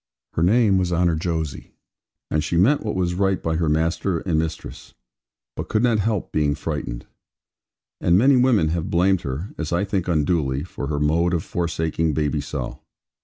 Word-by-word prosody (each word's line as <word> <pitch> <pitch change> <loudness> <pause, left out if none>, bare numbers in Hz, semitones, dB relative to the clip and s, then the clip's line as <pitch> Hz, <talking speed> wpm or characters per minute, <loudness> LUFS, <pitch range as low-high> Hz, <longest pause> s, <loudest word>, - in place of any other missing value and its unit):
Her - - -1
name 100 +1 +4
was 90 -1 -1
Honour 85 -1 +2
Jose, 80 -5 -3 0.6
and 75 0 +1
she 85 - -1
meant 125 - +4
what 105 - -2
was 90 -1 0
right 95 +1 +1
by 80 -1 -1
her 80 -2 +1
master 80 +4 0
and 85 -4 0
mistress; 80 0 -6 0.6
but - - -5
could 110 +1 +1
not 115 -3 +3
help 105 -2 -1
being 75 -2 +1
frightened. - - -4 0.9
And 85 +1 +3
many 135 +6 +5
women 125 -10 +3
have 85 0 -2
blamed 90 +2 +2
her, 70 +9 -4
as 80 -2 -3
I 85 +3 +1
think 95 -3 -2
unduly, 75 -4 0
for 80 -5 -6
her 75 0 -2
mode 85 +4 +2
of 80 - -2
forsaking 80 -2 -1
baby 75 -1 0
so. 70 -3 -5
85 Hz, 175 wpm, -22 LUFS, 80-95 Hz, 0.9 s, many